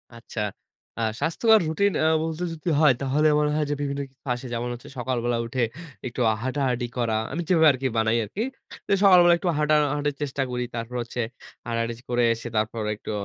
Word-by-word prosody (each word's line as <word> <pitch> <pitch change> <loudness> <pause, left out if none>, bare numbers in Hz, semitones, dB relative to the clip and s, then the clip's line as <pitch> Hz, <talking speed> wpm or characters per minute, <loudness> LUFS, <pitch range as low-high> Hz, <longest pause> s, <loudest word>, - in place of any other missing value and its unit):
আচ্ছা। 115 -1 -8 0.6
আ - - -1 0.2
স্বাস্থ্যকর 220 +7 +4
রুটিন 200 +6 +2 0.3
বলতে 165 +2 -3
যদি 165 +2 -4
হয় 150 -4 +6
তাহলে 145 +3 +2
মনে 150 0 +1
হয় 155 -1 +1
যে - - +1
বিভিন্ন 140 0 -2
কিছু 135 +1 -40
আসে। 125 +2 -7
যেমন 120 +1 -2
হচ্ছে 120 - -10
সকালবেলা 120 -1 -1
উঠে 120 +1 -1 0.4
একটু 125 +1 -4 0.2
হাঁটাহাটি 130 -2 -1
করা। 115 -2 0 0.2
আমি 160 +5 -2
যেভাবে 160 -3 +5
আরকি 130 0 -2
বানাই 110 +1 +2
আরকি। 205 - -4 0.4
তো - - -30
সকালবেলা 180 -3 +7
একটু 175 - -1
হাটাহাঁটির 150 -1 +2
চেষ্টা 140 -1 -1
করি। 125 0 -1
তারপর 115 +1 -5
হচ্ছে 120 +1 -4 0.5
হাটাহাঁটি 115 0 -1 0.2
করে 120 0 +2
এসে 115 +1 -7
তারপরে 110 0 -1
একটু 105 - -7
130 Hz, 175 wpm, -25 LUFS, 120-155 Hz, 0.6 s, সকালবেলা